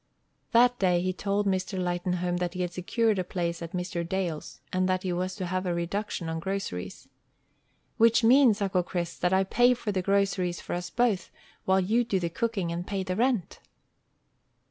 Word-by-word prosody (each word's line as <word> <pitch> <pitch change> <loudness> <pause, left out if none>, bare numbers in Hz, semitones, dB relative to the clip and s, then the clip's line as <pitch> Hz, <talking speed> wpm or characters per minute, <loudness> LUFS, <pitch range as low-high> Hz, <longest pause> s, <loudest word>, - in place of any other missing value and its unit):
That 245 +1 +4
day 180 -2 +3
he 185 +1 -1
told 200 +2 -1
Mr. 190 0 -1
Lightenhome 180 0 -1
that 180 0 -2
he 180 - -2
had 175 -1 -4
secured 210 +4 +1
a - - 0
place 170 -2 -3
at 170 0 -7
Mr. 180 0 -2
Dale's, 170 -3 -3
and 185 0 +1
that 185 0 0
he 185 -2 -1
was 185 +1 -2
to 190 - -4
have 185 +1 -2
a 175 - 0
reduction 170 +1 -3
on 160 0 -3
groceries. 190 - -4 0.9
"Which 230 +1 +5
means, 235 -3 +5
Uncle 190 -2 +1
Chris, 175 -1 -4
that 180 - +1
I 190 0 +4
pay 245 +6 +4
for 225 -3 -3
the 190 -2 0
groceries 195 -2 +1
for - - -6
us 175 0 -3
both, 225 -4 +1 0.4
while 190 0 +4
you 220 +6 +2
do 200 -5 0
the 170 -2 -2
cooking 200 -4 -1
and 175 +1 -4
pay 195 -2 -2
the 185 -1 -3
rent." 235 -4 0
185 Hz, 190 wpm, -28 LUFS, 175-205 Hz, 0.9 s, Which